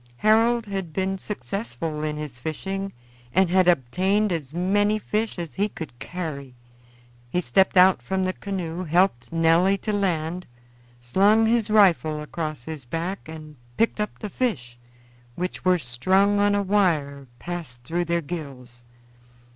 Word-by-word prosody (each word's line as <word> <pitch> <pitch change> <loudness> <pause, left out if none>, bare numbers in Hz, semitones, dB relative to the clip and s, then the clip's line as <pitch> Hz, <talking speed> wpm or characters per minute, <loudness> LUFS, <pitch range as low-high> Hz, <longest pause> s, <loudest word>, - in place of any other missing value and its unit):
Harold 225 - +3
had 195 -5 -4
been 190 +3 -1
successful 165 - -4
in 150 -1 -2
his 150 -5 -7
fishing 195 +7 -4 0.4
and 190 -2 +4
had 185 -1 +4
obtained 185 - +2
as 150 -6 -3
many 205 +5 +1
fish 215 +1 -2
as 170 -3 -5
he 205 +2 0
could 155 -10 -9
carry. 145 -7 -6 0.7
He 180 - 0
stepped 185 +5 +2
out 180 -6 +6
from 190 +9 -1
the 185 - -1
canoe, 185 -4 -4
helped 170 -8 +1
Nelly 165 +4 +3
to 210 +2 -3
land, 180 -3 -1 0.5
slung 200 - +4
his 225 -1 +2
rifle 175 -7 +4
across 155 -3 -5
his 155 0 -7
back, 165 +7 -4
and 155 -2 -10 0.2
picked 230 - +1
up 210 0 -3
the 210 - -6
fish, 130 - -2 0.6
which 180 +1 -4
were 185 0 +4
strung 185 +10 +2
on 205 0 +3
a 200 - +1
withe 155 -9 +1
passed 160 -9 -7
through 170 +6 -1
their 170 0 0
gills. 135 -7 -8
180 Hz, 145 wpm, -24 LUFS, 155-195 Hz, 0.7 s, out